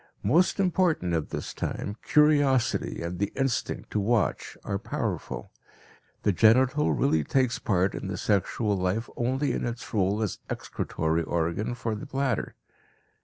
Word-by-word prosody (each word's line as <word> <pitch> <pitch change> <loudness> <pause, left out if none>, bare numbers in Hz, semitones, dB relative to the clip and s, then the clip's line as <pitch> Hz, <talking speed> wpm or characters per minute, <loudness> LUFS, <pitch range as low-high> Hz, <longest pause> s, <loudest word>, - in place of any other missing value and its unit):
Most 175 +7 +3
important 180 - +2
at 80 -2 -1
this - - -5
time, 100 - -4
curiosity 145 - +3
and 85 +1 -4
the 100 - 0
instinct 135 -3 -2
to 105 - 0
watch 110 +1 0
are 100 - -2
powerful. - - -4 0.7
The 105 - +3
genital 125 - +4
really 80 - +2
takes 130 - +1
part 95 -2 +1
in - - -5
the 95 -1 -3
sexual 105 +2 +1
life 95 +5 -1
only 130 +4 0
in - - -2
its 120 0 -5
role 100 +1 +1
as 105 - -3
excretory 80 +1 -2
organ 85 +8 -1
for 115 -2 -3
the 105 - -6
bladder. 135 -4 -1
110 Hz, 145 wpm, -27 LUFS, 95-130 Hz, 0.7 s, genital